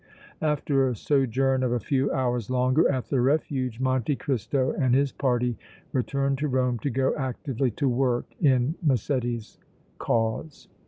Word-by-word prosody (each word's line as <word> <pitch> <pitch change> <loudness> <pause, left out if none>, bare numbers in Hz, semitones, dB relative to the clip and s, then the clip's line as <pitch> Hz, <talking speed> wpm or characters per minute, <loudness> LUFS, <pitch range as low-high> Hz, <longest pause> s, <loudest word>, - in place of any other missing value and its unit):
After 145 -3 +1
a 125 - -2
sojourn 135 +1 +1
of 125 -2 0
a 120 - +1
few 135 +4 0
hours 125 -4 -1
longer 130 +5 +3
at 130 -3 -2
the 135 -3 +1
Refuge, 130 -3 0
Monte 130 +1 +1
Cristo 130 0 -1
and 130 -2 +1
his 140 0 +2
party 125 -3 0 0.3
returned 140 +1 0
to 150 - 0
Rome 125 -3 0
to 140 - -2
go 130 +1 +1
actively 130 -1 -2
to 140 - +1
work 125 -1 +1 0.2
in 135 -2 +3
Massetti's 120 - -1 0.4
cause. 115 +7 -2
130 Hz, 150 wpm, -26 LUFS, 125-140 Hz, 0.4 s, longer